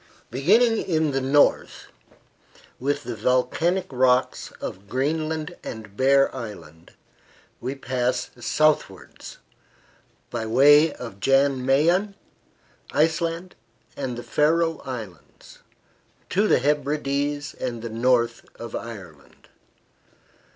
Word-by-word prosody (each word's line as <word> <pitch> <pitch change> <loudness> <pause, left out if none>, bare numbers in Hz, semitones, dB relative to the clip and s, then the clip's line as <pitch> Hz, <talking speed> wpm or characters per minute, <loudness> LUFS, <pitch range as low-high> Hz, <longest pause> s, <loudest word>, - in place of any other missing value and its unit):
Beginning 220 - +3
in 160 -6 0
the 135 0 -1
north 140 +2 +2 0.9
with 140 +3 -1
the 120 - -5
volcanic 160 - +1
rocks 130 0 +1
of 100 +2 -8
Greenland 155 +4 -2
and 110 -3 -8
Bear 135 +3 +3
Island, 100 -9 -9 0.7
we 130 +3 -4
pass 125 -1 -2
southwards, 155 +5 -1 0.9
by 115 -2 -3
way 145 +6 +6
of 115 -8 -9
Jan 135 +1 +2
Mayen, 170 +10 +2 0.8
Iceland 165 +3 0 0.4
and 130 -4 -4
the 120 - -6
Faroe 165 +2 +1
Islands, 110 -9 -10 0.7
to 205 +3 +2
the - - +4
Hebrides 145 +1 -1
and 120 -3 -5
the 115 - -4
north 115 0 +1
of 115 -1 -8
Ireland. 95 -11 -10
135 Hz, 100 wpm, -24 LUFS, 120-155 Hz, 0.9 s, way